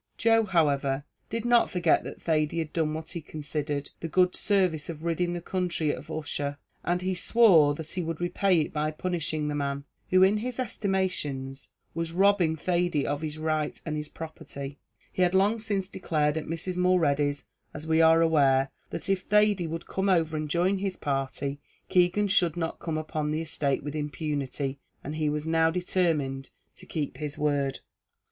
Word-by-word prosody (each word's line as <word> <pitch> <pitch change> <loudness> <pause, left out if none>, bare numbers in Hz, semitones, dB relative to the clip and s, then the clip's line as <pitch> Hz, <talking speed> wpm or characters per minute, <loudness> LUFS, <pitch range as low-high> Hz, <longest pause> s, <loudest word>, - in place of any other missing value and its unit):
Joe, 225 -1 +4
however, 145 -7 +1 0.3
did 230 +1 -3
not 240 -1 +4
forget 175 -3 +2
that - - -7
Thady 155 -1 0
had 160 -2 -3
done 155 -2 0
what 160 0 -5
he 170 - -5
considered 150 -1 -4
the 165 - -4
good 180 +2 +3
service 185 -7 +1
of 160 0 -6
ridding 175 +1 0
the 175 - -4
country 175 -4 -1
of 145 - -7
Ussher, 145 -2 -3 0.3
and 180 +1 0
he 190 0 0
swore 175 -7 +5
that 160 0 -7
he 185 - -2
would 165 -2 -4
repay 175 0 +2
it - - -4
by 150 0 0
punishing 155 -2 -2
the 150 - -1
man, 140 -1 -2 0.3
who 185 0 +5
in 195 +3 +5
his 245 +3 -4
estimation 185 - -1 0.4
was 165 0 -3
robbing 190 -3 +3
Thady 175 -2 0
of 145 +1 -2
his 155 -1 -4
right 155 -1 -1
and 155 -2 -2
his 150 0 -4
property; 140 -3 -8 0.3
he - - -1
had 180 +1 +3
long 205 +4 +3
since 200 -4 -2
declared 150 -6 0
at 160 - -3
Mrs. 170 +3 -3
Mulready's, 150 -6 +2 0.3
as 150 - -6
we 160 0 +3
are 165 0 +6
aware, 135 -4 +3 0.2
that - - -3
if 195 -1 +1
Thady 210 -3 +3
would 165 +1 -5
come 195 +1 -1
over 165 -4 +2
and 155 -1 -3
join 180 +5 +2
his 195 -1 -2
party, 140 0 -2 0.3
Keegan 185 +3 +3
should 175 -4 +3
not 165 -1 -3
come 160 -2 -3
upon 155 -1 -2
the 155 +2 -1
estate 140 -3 -1
with 145 +1 -5
impunity, 145 -2 -3 0.2
and 150 +3 -5
he 155 -1 +1
was 150 +1 -2
now 160 0 +3
determined 165 -6 0 0.3
to - - -12
keep 150 -4 -3
his 150 -2 -5
word. 145 -2 0
160 Hz, 180 wpm, -28 LUFS, 150-180 Hz, 0.4 s, are